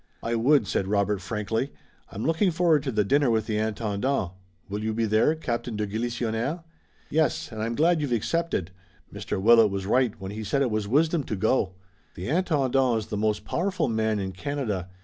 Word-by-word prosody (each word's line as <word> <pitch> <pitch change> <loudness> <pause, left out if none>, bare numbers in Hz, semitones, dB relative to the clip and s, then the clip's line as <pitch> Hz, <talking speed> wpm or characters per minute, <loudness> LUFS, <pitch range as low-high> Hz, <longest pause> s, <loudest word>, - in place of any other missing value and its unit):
"I 115 - -1
would," 125 +2 +4
said 95 - -1
Robert 100 -1 +1
frankly. 110 +6 -2 0.4
"I'm 105 - -5
looking 165 +6 +2
forward 165 -3 +3
to 135 - -3
the 105 -2 +2
dinner 140 +5 +3
with 110 -2 +1
the 105 -2 -1
Intendant. 110 0 -1 0.4
Will 105 +2 -4
you 110 0 -1
be 115 0 +1
there, 110 +8 +3
Captain 120 -6 -3
de 105 - 0
Galisonnière?" 120 - -2 0.5
"Yes, 155 -5 +1
and 110 -1 -5
I'm 115 +2 -2
glad 165 +3 +3
you've 145 -4 -2
accepted. 120 - -1 0.4
Mr. - - -4
Willet 115 +1 +6
was 95 -1 -3
right 120 +1 +1
when 95 0 -6
he 110 +1 -5
said 140 +7 +1
it 125 - 0
was 105 -1 -1
wisdom 155 +6 +2
to 110 - -3
go. 100 -2 +1 0.4
The 90 +6 -5
Intendant 135 -7 +2
is 110 - -3
the - - -3
most 105 0 0
powerful 185 -3 -1
man 110 -2 0
in 95 -1 -3
Canada. 105 - -3
115 Hz, 190 wpm, -26 LUFS, 105-140 Hz, 0.5 s, Willet